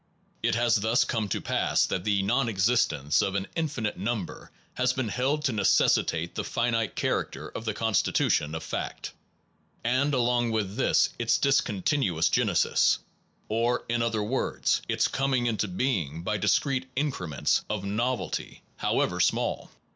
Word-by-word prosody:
It - - +1
has 120 0 +3
thus 110 +4 +2
come 110 -4 -2
to - - -1
pass - - +1
that 90 - -2
the 100 -2 +2
nonexistence 105 - +2
of 95 0 -1
an 100 -1 -1
infinite 140 - -2
number 105 -2 -4 0.2
has 125 0 +1
been 130 -3 -2
held 140 +7 0
to 130 - +2
necessitate 105 -4 +2
the - - -3
finite 115 -2 -1
character - - -2
of 115 - -7
the 110 -2 -2
constitution 100 -7 +1
of 80 - -5
fact; - - -5 0.7
and 130 +4 +1
along 120 -1 +2
with 105 -3 -2
this 130 - +3
its 120 -1 +2
discontinuous 105 - +1
genesis, - - +3 0.5
or, 115 +3 0
in 120 0 0
other 115 -2 0
words, 125 +6 0
its - - +1
coming 135 -3 0
into 110 -2 0
being 90 - -2
by 105 +3 -1
discrete 130 +6 +1
increments 95 - 0
of 105 -2 -3
novelty 115 +5 -2
however - - 0
small. - - 0
115 Hz, 145 wpm, -27 LUFS, 100-125 Hz, 0.7 s, has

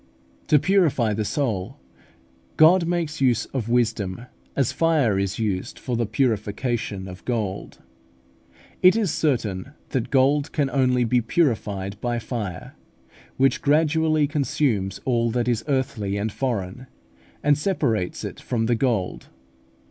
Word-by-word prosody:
To 155 - +5
purify 150 - +2
the 105 +1 -1
soul 105 -6 -2 0.8
God 165 +2 +6
makes 170 -4 -2
use 120 -4 +2
of 120 -4 -2
wisdom 115 -3 0 0.3
as 135 -4 +1
fire 150 -12 +2
is 100 0 -2
used 100 -5 -2
for 125 - -3
the 115 -1 0
purification 110 -3 -1
of 90 0 -10
gold. 105 -6 -4 1.0
It 185 +2 +7
is 215 -7 +1
certain 125 -5 -1 0.2
that 130 -4 -2
gold 140 +2 +2
can 140 -3 0
only 125 -2 +2
be 120 +1 +2
purified 105 - -1
by 120 -1 -1
fire, 110 -6 -5 0.6
which 135 0 +2
gradually 155 +1 +2
consumes 140 - -1
all 120 -2 +1
that 120 +1 -1
is 120 -2 0
earthly 115 -8 -1
and 105 +2 -2
foreign, 120 -1 -3 0.6
and 145 0 +4
separates 140 - -1
it - - -6
from 115 -2 -1
the 120 - +2
gold. 115 -6 -1
120 Hz, 135 wpm, -23 LUFS, 105-145 Hz, 1.0 s, It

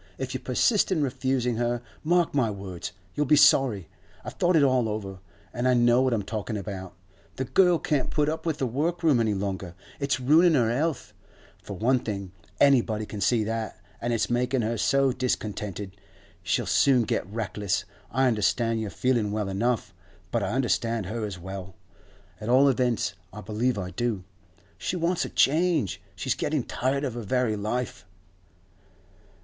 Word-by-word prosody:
If - - -4
you - - -2
persist 210 -5 +2
in 160 -5 +2
refusing 130 -3 -1
her, 120 0 0 0.2
mark 175 +1 +2
my 130 -6 +2
words, 95 -4 -6 0.2
you'll 150 -1 0
be 150 - +6
sorry. 120 - +4 0.4
I've - - -6
thought 180 0 +2
it 155 - +5
all 130 -4 +3
over, 100 -3 -5 0.3
and 120 +1 -1
I 125 - +4
know 120 +1 +4
what 130 -1 +2
I'm 110 -4 0
talking 110 +1 -4
about. 95 -3 -6 0.4
The 130 - -2
girl 180 +5 +4
can't 150 -4 -1
put 150 -2 +1
up 160 +1 -2
with 160 -3 -1
the 135 - -1
work 160 +8 -1
room 150 -7 +4
any 110 -3 +1
longer. 95 -3 -4 0.2
It's 140 -1 0
ruining 155 +6 +5
her 120 -3 +2
health, 155 +1 -2 0.5
for 100 - -8
one 125 +5 +2
thing, 100 -5 -5 0.3
anybody 115 -6 +3
can 105 -1 -7
see 115 +2 +2
that, 110 +1 -4 0.2
and 120 - -1
it's 115 - +1
making 125 +1 0
her 115 +2 -1
so 135 +4 +2
discontented, 105 -6 -3 0.5
she'll - - 0
soon 130 -4 +4
get 100 -3 -2
reckless. 105 -3 -2 0.2
I 130 +4 +1
understand 115 0 +1
your 110 - -3
feeling 120 -2 0
well 105 -2 -2
enough, 115 +3 -1 0.4
but - - 0
I - - -1
understand 115 -4 0
her 110 +3 -3
as 100 -3 -6
well; 95 +1 -8 0.6
at 105 - -5
all 135 +3 +6
events, 125 -4 0 0.2
I - - -8
believe 110 +4 -1
I 90 -2 -4
do. 110 0 -2 0.6
She - - -2
wants 175 0 0
a - - -6
change; 155 - +2
she's - - -1
getting - - -1
tired 135 +3 -1
of 130 -5 -2
her 120 - -5
very 115 +1 0
life. 110 +1 -3
120 Hz, 175 wpm, -26 LUFS, 105-135 Hz, 0.6 s, be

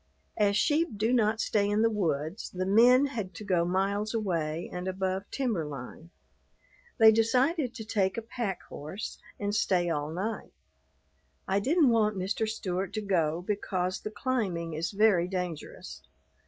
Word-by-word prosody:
As 205 -1 +2
sheep 305 -5 +1
do 220 +4 +1
not 220 -2 +2
stay 205 -2 +1
in 210 +2 +2
the 230 - +4
woods, 165 -2 -2
the 185 0 -3
men 245 +7 +6
had 215 -10 -5
to 215 - -7
go 180 -4 +2
miles 200 +4 0
away 170 -6 -1
and 180 +1 -4
above 190 +1 -2
timber 235 - -1
line. 150 +3 -8 0.9
They 220 -1 +8
decided 250 +5 +2
to 220 -3 -7
take 195 -3 0
a 230 - -3
pack 225 -5 -4
horse 155 +9 -7 0.2
and 205 0 -2
stay 180 -4 +1
all 150 -1 -2
night. 195 +7 -4 0.9
I 195 +1 +2
didn't 290 - +3
want 215 -3 +2
Mr. 200 +4 -1
Stewart 190 -3 -3
to 215 - -2
go 170 -4 0
because 185 -2 -2
the - - -4
climbing 205 -8 -2
is 160 +2 -2
very 200 -4 +3
dangerous. 180 -4 -5
200 Hz, 155 wpm, -29 LUFS, 180-225 Hz, 0.9 s, They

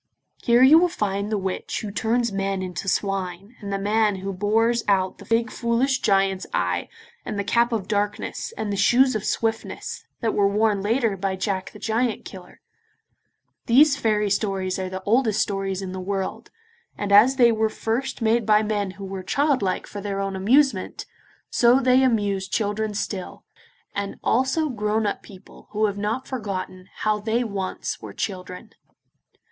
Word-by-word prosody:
Here 240 +1 +4
you 300 +5 +8
will 360 - +4
find 205 - -2
the 215 - +1
witch 190 -1 -3
who 210 - -5
turns 230 +2 0
men 195 -1 -2
into 185 +1 -4
swine, 195 +2 -2
and 200 -1 -5
the 195 - 0
man 210 +1 +1
who 195 +1 -5
bores 225 +5 +1
out 190 -2 +1
the - - -12
big 230 -1 +1
foolish 250 +3 +1
giant's 195 -1 +1
eye, - - -1 0.3
and 210 - -5
the 200 - -1
cap 235 +4 +2
of 215 -5 -2
darkness, 205 - -2
and 205 -2 -2
the - - -2
shoes 255 +6 +4
of 215 - -2
swiftness, 225 -1 -3 0.2
that 225 -2 0
were 200 -1 +3
worn 210 0 +1
later 225 0 +1
by 190 0 -2
Jack 190 0 -2
the - - -12
Giant 225 +2 -1
Killer. 185 -2 -12 1.1
These 280 +5 +6
fairy 210 -5 0
tales 195 -2 -1
are 185 0 -3
the 190 0 -6
oldest 220 0 +2
stories 195 -1 -1
in 185 - -5
the 185 - -5
world, 195 0 -4 0.5
and 205 -1 -3
as 220 +7 +7
they 240 -3 +5
were 220 -1 +1
first 230 +3 -3
made 225 +1 +3
by 215 0 +4
men 205 -2 -1
who 200 - -7
were 190 0 -5
childlike 260 -3 0
for 205 - -8
their 200 -1 -3
own 195 -1 -2
amusement, 260 +9 +2 0.5
so 240 +2 +5
they 255 0 +4
amuse 205 -6 +1
children 210 0 -1
still, 195 -2 -4 0.5
and 200 0 -3
also 265 +6 +1
grown 215 -2 -1
up 205 - -2
people 195 -2 -15
who 215 +1 +2
have 205 -1 -2
not 220 +6 -2
forgotten 195 -6 -5
how 215 -1 +1
they 225 +3 0
once 200 -4 -4
were - - -8
children. 185 +2 -5
210 Hz, 175 wpm, -23 LUFS, 195-230 Hz, 1.1 s, you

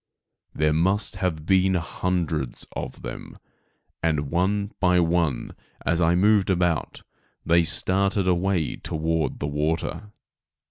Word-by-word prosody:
There 75 0 +2
must 95 +5 0
have 85 -5 -2
been 95 +1 +3
hundreds 85 -5 -2
of - - -6
them, - - -7 0.6
and, 75 -4 0
one 100 +4 0
by 90 -1 +3
one, 85 -6 0 0.3
as 85 +1 +1
I 85 +1 +3
moved 100 +1 +3
about, 90 -3 0 0.4
they 85 +1 +4
started 95 +3 +1
away 90 -2 +1
toward 80 +1 -2
the - - -3
water. 80 +7 -2
85 Hz, 120 wpm, -24 LUFS, 80-95 Hz, 0.6 s, they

